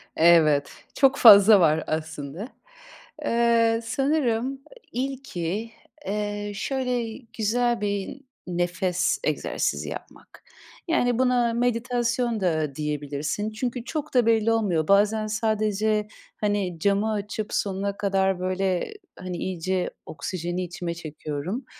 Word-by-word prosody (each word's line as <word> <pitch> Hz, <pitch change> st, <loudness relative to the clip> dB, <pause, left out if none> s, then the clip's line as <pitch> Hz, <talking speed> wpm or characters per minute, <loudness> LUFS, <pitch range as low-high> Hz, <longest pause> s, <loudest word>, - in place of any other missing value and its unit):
Evet. 155 Hz, -4 st, +5 dB, 0.2 s
Çok 275 Hz, 0 st, +4 dB
fazla 205 Hz, -2 st, +9 dB
var 160 Hz, -2 st, +3 dB
aslında. 155 Hz, -, -4 dB, 0.8 s
Eee, 230 Hz, -1 st, +3 dB
sanırım, 255 Hz, -2 st, +1 dB
ııı, 275 Hz, -, -5 dB, 0.3 s
ilki, 230 Hz, -6 st, -3 dB, 0.4 s
eee, 205 Hz, 0 st, -3 dB
şöyle 250 Hz, -2 st, -2 dB, 0.2 s
güzel 235 Hz, +2 st, +1 dB
bir 205 Hz, +6 st, -3 dB, 0.3 s
nefes 180 Hz, 0 st, 0 dB
egzersizi -, -, -1 dB
yapmak. -, -, -10 dB, 0.4 s
Yani, 245 Hz, -8 st, +1 dB
buna 250 Hz, -2 st, +2 dB
meditasyon 240 Hz, -1 st, 0 dB
da 155 Hz, -6 st, 0 dB
diyebilirsin. 150 Hz, +7 st, -3 dB
Çünkü 240 Hz, +2 st, -3 dB
çok 305 Hz, +3 st, -4 dB
da 245 Hz, -3 st, +4 dB
belli 225 Hz, -1 st, +3 dB
olmuyor. 190 Hz, -9 st, +1 dB
Bazen 210 Hz, +2 st, +3 dB
sadece, 215 Hz, -1 st, 0 dB, 0.3 s
hani, 205 Hz, -5 st, -1 dB
camı 200 Hz, +4 st, +1 dB
açıp 210 Hz, +1 st, -4 dB
sonuna 200 Hz, 0 st, -1 dB
kadar 195 Hz, -2 st, +1 dB
böyle, 185 Hz, -, -1 dB, 0.3 s
hani, 185 Hz, -1 st, -5 dB
iyice 185 Hz, +1 st, -2 dB, 0.2 s
oksijeni 175 Hz, +4 st, -4 dB
içime 175 Hz, -1 st, -4 dB
çekiyorum. 160 Hz, -, -5 dB
205 Hz, 105 wpm, -25 LUFS, 180-235 Hz, 0.8 s, fazla